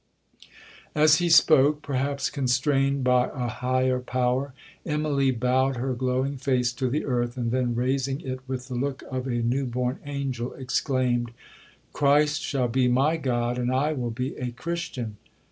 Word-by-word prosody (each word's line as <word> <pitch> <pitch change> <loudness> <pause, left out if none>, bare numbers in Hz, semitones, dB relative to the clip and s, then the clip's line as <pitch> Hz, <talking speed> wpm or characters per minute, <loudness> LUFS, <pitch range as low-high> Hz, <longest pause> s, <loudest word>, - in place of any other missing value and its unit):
'As 150 0 +6
he 175 0 0
spoke, 150 -2 +5
(perhaps 140 +1 -1
constrained 135 0 +1
by 125 0 +3
a 125 -2 -2
higher 130 +2 0
power), 125 +2 -1 0.3
Immalee 150 -3 0
bowed 130 +2 +2
her 130 +2 -2
glowing 130 +2 -1
face 125 -2 0
to 130 +1 -1
the 145 +5 -1
earth, 120 -2 -1
and 120 -2 -1
then 125 -1 0
raising 135 +2 0
it 130 -1 -5
with 130 -1 -4
the 130 - -6
look 135 +2 -2
of 130 0 -3
a 120 -2 -1
new 130 +3 0
born 125 +1 -2
angel, 135 -4 -3
exclaimed, 125 -2 0 0.6
'Christ 145 +1 +3
shall 130 -3 0
be 125 +1 +2
my 135 +6 +3
God, 125 -5 -1
and 125 0 0
I 145 +4 +1
will 125 -5 -3
be 125 +4 -4
a 125 - -3
Christian!' 125 -6 -5
130 Hz, 160 wpm, -26 LUFS, 125-140 Hz, 0.6 s, As